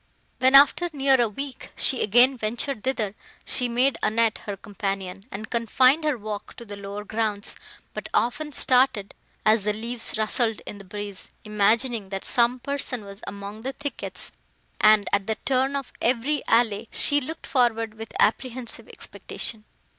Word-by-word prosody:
When, 260 +2 +5
after 290 +5 +6
near 270 -2 +4
a 235 - +2
week, 275 +5 -7
she 260 - +1
again 245 +5 +5
ventured 235 +1 -3
thither, 230 -6 -1 0.3
she 250 -2 0
made 250 +2 +2
Annette 220 +1 +1
her 200 -1 -4
companion, 195 -1 -5
and 215 +3 -7
confined 255 +6 +3
her 300 -4 +1
walk 210 -1 -7
to 235 - -11
the 205 -2 -8
lower 200 +1 -7
grounds, 215 -1 -2 0.4
but - - -6
often 295 +6 0
started 250 -7 +2 0.3
as 215 -1 +4
the 210 - +1
leaves 230 +1 -5
rustled 220 +1 +1
in 205 - -7
the - - -10
breeze, 200 0 -7
imagining, 215 +1 +1
that 195 -1 -5
some 240 0 +3
person 255 -4 -4
was 200 0 -10
among 200 +2 -7
the 265 +3 -4
thickets; 285 +2 -4 0.5
and, 215 -1 +5
at 200 -1 +1
the 220 - 0
turn 265 +1 +1
of 275 -2 -4
every 260 +5 +1
alley, 225 -2 +2
she 290 0 +6
looked 315 +5 -7
forward 230 -4 +1
with 225 0 -9
apprehensive 250 +1 -1
expectation. 215 -2 -6
230 Hz, 160 wpm, -25 LUFS, 210-260 Hz, 0.5 s, after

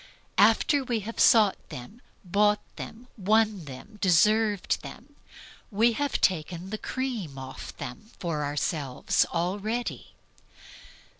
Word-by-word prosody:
After 285 -3 +4
we 240 -4 -1
have 230 +3 -7
sought 215 -4 +5
them, 165 - -9 0.2
bought 205 +3 +2
them, 235 +3 -9
won 215 -2 +2
them, 145 +11 -11
deserved 210 +3 +3
them, 285 +5 -11 0.5
we 230 +3 +3
have 285 +4 -1
taken 180 +1 0
the 215 - -3
cream 235 - -4
off 130 0 -8
them 125 - -8
for 160 -4 -2
ourselves 145 -2 0
already. 205 +8 -3
205 Hz, 115 wpm, -27 LUFS, 165-225 Hz, 0.5 s, sought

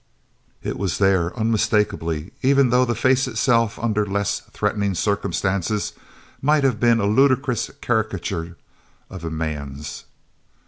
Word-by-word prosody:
It - - -4
was 95 -3 -1
there 95 -4 +2
unmistakably, 105 -7 0
even 135 -1 +4
though 125 +1 +4
the 120 -1 -1
face 130 +3 +2
itself, 115 -1 +1
under 110 -2 0
less 100 0 -1
threatening 100 -2 -1
circumstances, 100 +1 -1 0.5
might 150 +1 +3
have 130 -5 +2
been 115 -1 +4
a 100 - +1
ludicrous 130 +2 +2
caricature 100 -7 -2 0.5
of 95 -3 -8
a 85 - -3
man's. 75 -3 -5
105 Hz, 125 wpm, -22 LUFS, 90-120 Hz, 0.5 s, even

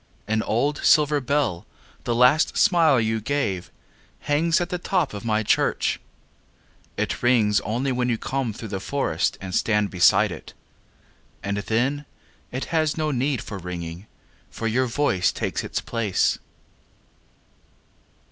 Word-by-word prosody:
An 110 +1 +1
old 135 +8 0
silver 150 -2 +4
bell, 130 -9 -1 0.4
the 120 - 0
last 125 +6 +4
smile 165 -7 +4
you 110 0 0
gave, 105 -8 -2 0.5
Hangs 160 +4 +2
at 175 - -2
the 180 - -3
top 180 - 0
of 105 - -6
my 110 -1 0
church.It - - -3
rings 115 -4 +3
only 125 +5 -1
when 125 0 0
you 115 - +1
come 130 0 -2
through 110 +1 -8
the 95 -1 -3
forestAnd 95 -6 -2
stand 105 0 +1
beside 90 -2 +4
it. - - -10 0.9
And 100 +1 -2
then, 125 +8 -1 0.5
it 130 +1 -3
has 155 -1 +1
no 155 -1 0
need 135 0 -1
for 100 -3 -7
ringing, 85 +1 -7 0.4
For 115 - -6
your 125 +3 +1
voice 115 -8 +1
takes - - -3
its - - -3
place. 115 -5 0
120 Hz, 135 wpm, -24 LUFS, 105-145 Hz, 0.9 s, silver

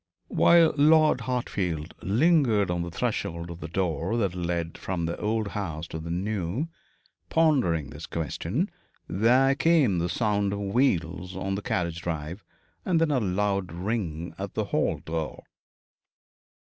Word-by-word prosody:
While 170 -1 +5
Lord 155 -2 +5
Hartfield 95 -10 -2
lingered 115 - +3
on 90 -1 -1
the 85 - -3
threshold 85 0 -3
of 85 - -8
the 85 - -6
door 85 +3 -1
that 100 -6 0
led 85 -2 -2
from 90 -3 -3
the 85 - -2
old 110 0 0
house 85 -7 -4
to 80 - -5
the 80 +1 -7
new, 100 - -2 0.6
pondering 125 - +2
this 75 +2 -8
question, 80 -5 -2 0.4
there 125 +7 +4
came 145 - +3
the 85 +1 -1
sound 100 0 +1
of 100 - -3
wheels 95 -5 0
on 95 +1 -2
the 100 - -2
carriage 85 -4 -2
drive, 80 +3 -4 0.4
and 175 -3 +2
then 165 -2 +2
a 135 - +2
loud 100 -2 0
ring 85 -3 -3
at - - -5
the - - 0
hall - - 0
door. 80 -1 -4
95 Hz, 145 wpm, -27 LUFS, 85-115 Hz, 0.6 s, While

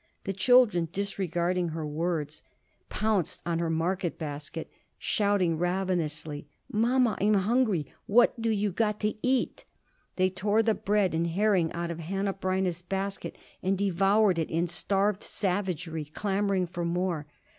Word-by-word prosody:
The 195 - -2
children, 205 -5 +4
disregarding 180 -2 -1
her 160 -1 -4
words, 155 0 -2 0.5
pounced 210 -5 0
on 170 -1 0
her 170 -1 0
market 170 +2 -1
basket, 155 +1 -5 0.3
shouting 200 -6 +1
ravenously: 165 -5 -1 0.2
"Mama, 235 0 +2
I'm 210 +1 +4
hungry! 205 - +2 0.2
What 240 +4 +5
more 230 - -9
do 225 - +1
you 210 -2 +1
got 210 +2 0
to 210 0 +1
eat?" 255 -1 0 0.5
They 185 0 +2
tore 205 +4 +1
the 220 0 +3
bread 205 -3 +1
and 165 +1 +1
herring 185 -1 +2
out 170 0 -3
of 170 - -6
Hanneh 195 +4 -2
Breineh's 185 -2 0
basket 195 +2 -4 0.2
and 190 +1 +1
devoured 195 0 +3
it 160 - -1
in 165 +2 +1
starved 195 +3 +1
savagery, 180 -5 -2
clamoring 195 +3 0
for 175 0 -5
more. 170 -3 -1
185 Hz, 145 wpm, -28 LUFS, 170-205 Hz, 0.5 s, What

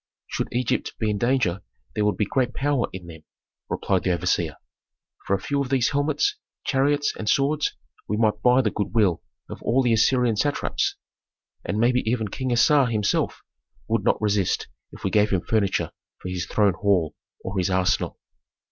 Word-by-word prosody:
"Should - - -3
Egypt 125 +1 -1
be 110 -2 0
in 100 - -2
danger 120 -7 +1 0.3
there 105 - 0
would 105 - +1
be 105 - +1
great 125 +2 -1
power 140 -3 +1
in 90 -1 -8
them," 80 -2 -11 0.5
replied 95 -2 0
the 95 - 0
overseer. 85 -2 0 0.7
"For 100 - +3
a - - -3
few 140 +8 -1
of 135 - -3
these 130 -3 +2
helmets, 155 - +1 0.3
chariots 145 +1 +1
and 105 - -3
swords 145 +2 +1 0.3
we 105 - -1
might 105 -1 +1
buy 125 +3 +4
the 105 - +1
good 105 - -3
will 100 -7 +3 0.3
of - - -9
all 130 +3 +2
the 120 -2 +3
Assyrian 115 0 +3
satraps. 145 +6 0 0.7
And 100 - -2
maybe 125 +3 +3
even 110 -2 0
King 130 +4 -3
Assar 135 +3 +4
himself 110 -4 0 0.4
would - - 0
not - - +2
resist 105 -3 0 0.2
if - - -13
we 95 - 0
gave 105 +1 +3
him 95 -3 +1
furniture 100 +2 0 0.3
for 90 - -6
his 90 -1 -3
throne 105 -3 +3
hall, 95 -4 +1 0.3
or 95 +1 -3
his 90 - +1
arsenal." 95 0 +1
110 Hz, 180 wpm, -24 LUFS, 100-130 Hz, 0.7 s, buy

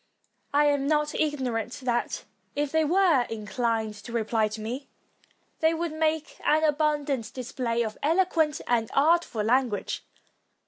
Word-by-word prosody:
I 290 +1 +4
am 285 -1 +2
not 300 0 +1
ignorant 255 -7 -1
that, 240 -1 -1 0.3
if 290 -1 -1
they 320 0 +3
were 330 -6 +3
inclined 225 0 -1
to 235 - -8
reply 225 -1 +1
to 215 +1 -7
me, 245 +6 -5 0.7
they 320 +1 +3
would 330 -1 -2
make 315 0 -1
an 310 +1 +3
abundant 295 -5 +1
display 240 -2 -1
of 215 -1 -5
elo 335 +6 +3
quent 315 -4 0
and 230 -2 +1
artful 300 -6 +3
language. 240 -1 0
275 Hz, 140 wpm, -27 LUFS, 230-310 Hz, 0.7 s, I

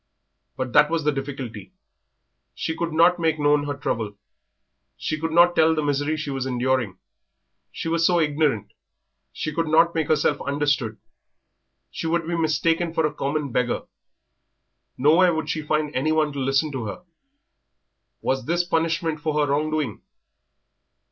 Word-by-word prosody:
But 130 -2 -3
that 150 0 +6
was 165 -1 -1
the 150 - +2
difficulty. 135 -7 -6 0.8
She 160 - -3
could 170 0 -2
not 170 +3 +4
make 160 -1 +1
known 145 -1 +2
her 145 - -2
trouble; 110 -6 -3 0.8
she 155 - -3
could 165 +1 -2
not 175 +1 +5
tell 160 0 +4
the 155 - -1
misery 145 +2 0
she 150 -2 -4
was 135 -1 -3
enduring. 125 -5 0 0.7
She - - -5
was 165 0 +1
so 175 0 +4
ignorant; 145 -9 0 0.6
she 155 - -4
could 165 +1 -1
not 165 +2 +4
make 160 -2 -1
herself 150 -1 +1
understood. 140 -6 -1 0.9
She - - -4
would 165 0 0
be 170 - -1
mistaken 165 +1 0
for 160 - +2
a 150 - -1
common 145 -1 -2
beggar. 120 0 0 1.1
Nowhere 165 +6 +4
would 160 - -2
she 155 - -2
find 150 -1 -1
anyone 155 +2 +1
to 140 - -4
listen 135 +3 +1
to 130 -5 -4
her. 110 - -6 1.2
Was 130 -2 -1
this 170 +2 +2
punishment 165 -1 0
for 155 -1 -2
her 145 -2 +1
wrong 150 +2 0
doing? 150 -9 -2
150 Hz, 155 wpm, -23 LUFS, 135-160 Hz, 1.2 s, that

